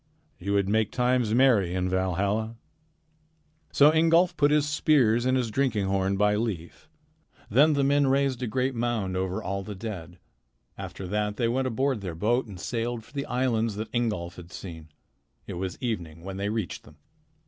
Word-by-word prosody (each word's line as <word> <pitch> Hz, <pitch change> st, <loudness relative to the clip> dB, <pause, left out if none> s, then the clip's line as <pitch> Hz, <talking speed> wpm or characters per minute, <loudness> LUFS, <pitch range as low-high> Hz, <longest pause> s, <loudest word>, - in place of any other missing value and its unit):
You 100 Hz, +2 st, -2 dB
would 100 Hz, -1 st, +2 dB
make 110 Hz, 0 st, +1 dB
times 125 Hz, -2 st, +1 dB
merry 115 Hz, -9 st, +4 dB
in 90 Hz, 0 st, 0 dB
Valhalla." 100 Hz, +5 st, 0 dB, 1.2 s
So 145 Hz, +2 st, +6 dB
Ingolf 165 Hz, +2 st, +4 dB
put 145 Hz, -1 st, +3 dB
his 150 Hz, 0 st, +3 dB
spears 130 Hz, -6 st, +3 dB
and 130 Hz, 0 st, +3 dB
his 120 Hz, -3 st, -1 dB
drinking 115 Hz, -5 st, +1 dB
horn 95 Hz, 0 st, 0 dB
by 105 Hz, +1 st, +3 dB
Leif. 105 Hz, -, -4 dB, 0.6 s
Then 145 Hz, +7 st, +5 dB
the 140 Hz, -1 st, +1 dB
men 140 Hz, 0 st, +3 dB
raised 135 Hz, -1 st, +1 dB
a 125 Hz, -, -1 dB
great 130 Hz, +4 st, 0 dB
mound 115 Hz, -6 st, -1 dB
over 95 Hz, 0 st, -2 dB
all 100 Hz, +1 st, -2 dB
the 105 Hz, +1 st, -7 dB
dead. 95 Hz, -5 st, -7 dB, 0.6 s
After 95 Hz, -, -7 dB
that 105 Hz, +1 st, -1 dB
they 120 Hz, -, +1 dB
went 130 Hz, +3 st, 0 dB
aboard 130 Hz, -1 st, 0 dB
their 90 Hz, -4 st, -5 dB
boat 120 Hz, +8 st, +1 dB
and 95 Hz, -4 st, -9 dB
sailed 115 Hz, +2 st, -3 dB
for 115 Hz, -, -20 dB
the 140 Hz, -1 st, -3 dB
islands 115 Hz, -4 st, 0 dB
that 110 Hz, +2 st, -6 dB
Ingolf 105 Hz, -8 st, -1 dB
had 90 Hz, 0 st, -11 dB
seen. 80 Hz, -4 st, -9 dB, 0.6 s
It -, -, -6 dB
was 90 Hz, 0 st, -4 dB
evening 85 Hz, -10 st, -4 dB
when 95 Hz, 0 st, -6 dB
they 100 Hz, +1 st, -2 dB
reached 105 Hz, -5 st, -3 dB
them. 75 Hz, -, -18 dB
110 Hz, 180 wpm, -27 LUFS, 95-130 Hz, 1.2 s, So